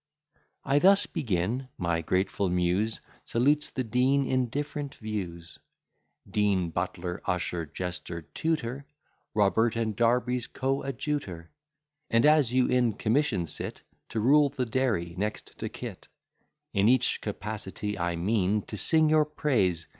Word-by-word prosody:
" - - -42
I 145 - +6
thus 195 +4 +6
begin: 110 +4 -1
My 85 -1 0
grateful 95 +3 0
Muse 90 +5 +1 0.2
Salutes 145 +6 +2
the 130 - -2
Dean 130 +4 +2
in 130 -1 +1
different 145 +2 -4
views; 90 -6 -6 0.7
Dean, 100 -5 +1
butler, 90 0 -3
usher, 90 -2 -1
jester, 90 +1 -5
tutor; 140 - -3 0.5
Robert 110 +3 +3
and 110 -2 -1
Darby's 120 +1 +1
coadjutor; 135 - -3 0.6
And, 115 0 +4
as 150 -5 +5
you 130 0 +3
in 125 -3 +2
commission 115 - +1
sit, 75 - -4 0.3
To 110 - -2
rule 140 +6 +5
the 130 -2 -2
dairy 110 -9 0
next 105 +1 -3
to - - -3
Kit; - - -8 0.7
In 100 +2 +4
each 130 -1 +3
capacity 105 -1 -4
I 85 0 0
mean 100 +3 +1
To 105 - -6
sing 155 - +3
your 155 0 +4
praise. 100 - 0
110 Hz, 130 wpm, -28 LUFS, 90-130 Hz, 0.7 s, I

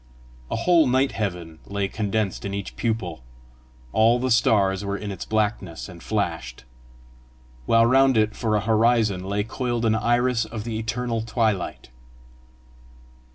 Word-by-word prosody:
A - - -2
whole 165 +5 +4
night 130 +2 +2
heaven 85 -6 -4
lay 100 -1 -1
condensed 105 -1 -2
in 100 0 -3
each 100 -1 -6
pupil; 110 - -2 0.7
all 115 +2 +4
the 130 +1 -1
stars 100 -4 +3
were 100 0 -2
in 105 0 -5
its 95 - -6
blackness, 105 -6 -2
and 90 -3 -12
flashed; 85 - -3 1.0
while 115 0 +5
round 135 +1 +4
it 110 0 +2
for 110 -3 0
a 105 - +1
horizon 110 -3 +2
lay 100 +2 -1
coiled 120 +1 -2
an 110 - +3
iris 120 +1 +1
of 110 -1 -6
the 110 -1 -4
eternal 115 0 -2
twilight. 110 - -1
110 Hz, 145 wpm, -24 LUFS, 100-115 Hz, 1.0 s, while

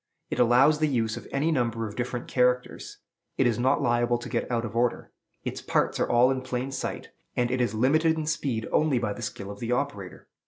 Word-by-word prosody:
It - - -2
allows 125 +5 +5
the 155 - +2
use 115 -5 0
of - - -9
any 145 +4 +1
number 115 -5 0
of 105 - -9
different 120 0 -3
characters, 125 0 0 0.4
it 135 - +3
is 120 -2 +1
not 130 +3 +2
liable 120 0 +2
to 120 - -8
get - - -2
out 120 -1 0
of 115 - -7
order, 120 0 0 0.3
its - - -4
parts - - 0
are - - +1
all 120 +2 +5
in 130 -1 -1
plain 130 +1 -3
sight, 135 - -4 0.3
and 120 0 +1
it 130 0 0
is 120 -2 0
limited 155 +8 +3
in 155 - -2
speed 135 -7 -2
only 150 -4 +2
by 110 -4 -1
the 120 - -9
skill 100 -2 -5
of 100 - -10
the 120 0 -3
operator. 120 -8 -3
125 Hz, 225 wpm, -27 LUFS, 115-135 Hz, 0.4 s, allows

